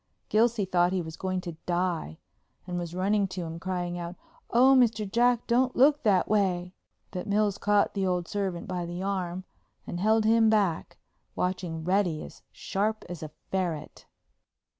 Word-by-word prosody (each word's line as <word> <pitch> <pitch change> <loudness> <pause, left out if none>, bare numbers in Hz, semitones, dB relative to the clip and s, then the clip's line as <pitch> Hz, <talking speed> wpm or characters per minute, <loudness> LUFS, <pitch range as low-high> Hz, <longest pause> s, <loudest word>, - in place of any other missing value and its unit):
Gilsey 225 -1 +3
thought 180 0 +2
he 185 - 0
was 160 0 -8
going 185 -1 -2
to 170 -3 -7
die 175 - -1 0.5
and 180 -1 -3
was 175 -1 -4
for 175 - -8
running 200 +2 +2
to 185 -1 -5
him, 165 0 -6
crying 175 -1 -3
out, 170 +1 -6 0.3
"Oh, 260 +3 +6
Mr. 225 -4 +3
Jack, 240 +3 +2
don't 250 +2 +2
look 285 +3 +5
that 195 -5 +3
way." 185 -4 +1 0.4
But 185 +1 -5
Mills 205 -1 +1
caught 205 0 +2
the 195 -2 0
old 180 -2 -1
servant 190 -4 -3
by 180 -2 -3
the 175 +2 -5
arm 185 -2 -2 0.4
and 175 - -5
held 220 +3 +3
him 225 0 +5
back, 200 -7 +1 0.4
watching 180 -3 -2
Reddy 180 -3 +1
as - - -12
sharp 215 +3 -2
as 175 -3 -6
a 155 - -6 0.2
ferret. 170 -5 -3
185 Hz, 170 wpm, -28 LUFS, 175-215 Hz, 0.5 s, Oh